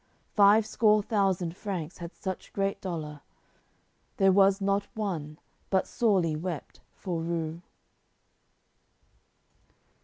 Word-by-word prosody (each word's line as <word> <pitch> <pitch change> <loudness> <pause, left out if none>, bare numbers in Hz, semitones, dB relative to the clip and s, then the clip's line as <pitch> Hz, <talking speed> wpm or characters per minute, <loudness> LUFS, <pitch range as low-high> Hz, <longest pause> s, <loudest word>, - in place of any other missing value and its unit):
Five 210 +1 +6
score 215 -1 +3
thousand 190 -5 0
Franks 185 -5 -5
had 170 0 -8
such 190 -2 -6
great 195 0 -1
dolour 155 -5 -5 1.0
There 195 0 +5
was 195 +1 +5
not 200 0 0
one 165 -8 -3 0.3
but 190 -1 +2
sorely 190 -9 +1
wept 165 -1 -6
for 175 -4 -3
rue. 165 0 -3
190 Hz, 100 wpm, -28 LUFS, 165-200 Hz, 1.0 s, Five